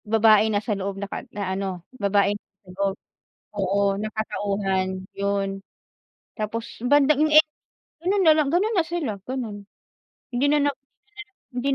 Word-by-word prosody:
Babae 220 0 +5
nasa 210 +1 0
loob 195 0 -3
na 200 - -3
ka - - -5
na 200 -3 -3
ano, 190 -3 -4 0.2
babae 200 0 +3
nasa 200 -2 -14
loob 195 0 -1 0.6
oo 200 0 +2
na 215 - -3
katauhan, 195 -3 -2
yun. 195 -1 -1 0.8
Tapos 225 +1 -3 0.2
bandang 290 +2 +4
yun, 310 - 0
eh, 310 +1 +9 0.6
ganun 380 +4 +1
na 320 -2 +7
lang 305 -2 +2
ganun 400 +7 +2
na 345 - +4
sila, 340 -8 -2 0.2
ganun, 220 -6 -5 0.7
hindi 245 +3 +1
na 300 - +4
nag - - -3 0.8
hindi 250 +2 -2
210 Hz, 150 wpm, -24 LUFS, 195-275 Hz, 0.8 s, eh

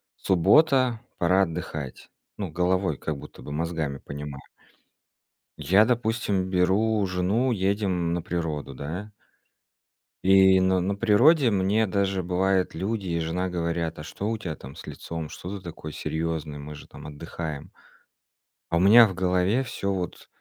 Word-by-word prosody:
суббота, 125 - +3 0.2
пора 95 +2 +3
отдыхать. 75 -5 -6 0.3
Ну, 100 -4 -4
головой 90 0 +1
как 75 +1 -4
будто - - -12
бы, - - -8
мозгами 80 -2 -2
понимаю. 70 0 -7 1.2
Я, 95 +8 +4
допустим, 110 -5 0
беру 100 +4 +2
жену, 95 +8 0
едем 95 -4 0
на 85 - -1
природу, 80 -5 -3
да? 85 +10 -6 1.1
И 95 0 +6
на 95 0 +2
на 100 +3 -1
природе 120 +5 +4
мне 100 +3 +2
даже 95 -1 0
бывает 95 +1 +1
люди 100 +4 -3
и 85 -1 -1
жена 85 +3 -2
говорят: 85 -2 -2
"А - - -6
что 100 +6 -5
у 115 - -1
тя 85 -8 -5
там 65 +1 -11
с - - -11
лицом? 80 -2 -6
Что 95 +6 -7
ты - - -16
такой 80 -3 -8
серьёзный? 80 -2 -3
Мы 75 +1 -8
же 75 - -12
там - - -11
отдыхаем". 75 0 -6 1.0
А 85 - +2
у - - +3
меня 110 +5 +8
в 95 - -5
голове 90 +6 +1
всё 100 -6 -3
вот 90 -2 -5
90 Hz, 150 wpm, -26 LUFS, 80-100 Hz, 1.2 s, меня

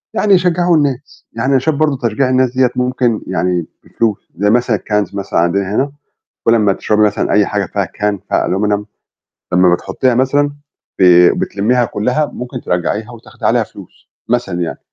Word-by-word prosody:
يعني 205 -1 +3
يشجعوا 175 -2 +3
الناس؟ 140 -2 -3
يعني 135 - -1
أنا 135 - +4
شايف 150 +3 -1
برضه 150 -2 +1
تشجيع 130 +5 0
الناس 130 -1 +2
ديّة 130 -2 +4
ممكن 125 -2 0
يعني 90 -1 -1 0.2
بفلوس، 110 -3 -2
زَي 105 +2 +1
مثلًا 120 0 +2
الCans 105 -1 -2
مثلًا 100 -3 -1
عندنا 95 +4 0
هنا، 140 +4 0 0.5
كلّ 115 - +4
أمّا 105 -3 +3
تشربي 105 +2 0
مثلًا 105 -1 +1
أي 100 0 +4
حاجة 105 -2 -1
فيها 100 +2 -2
Can 105 +3 -2
فيها - - 0
Aluminum 105 +2 0 0.7
لمّا 90 -1 +5
بتحطيها 125 +7 -1
مثلًا، 140 +3 +2 0.5
ب 95 - +4 0.4
بتلميها 120 +5 +1
كلّها، 125 +9 -1
ممكن 125 -2 -7
ترجّعيها، 105 +6 -2
وتأخدي 115 - -10
عليها - - +3
فلوس - - -15 0.2
مثلًا - - 0
يعني، 85 -1 -1
يعني 80 - -6
110 Hz, 175 wpm, -15 LUFS, 100-130 Hz, 0.7 s, لمّا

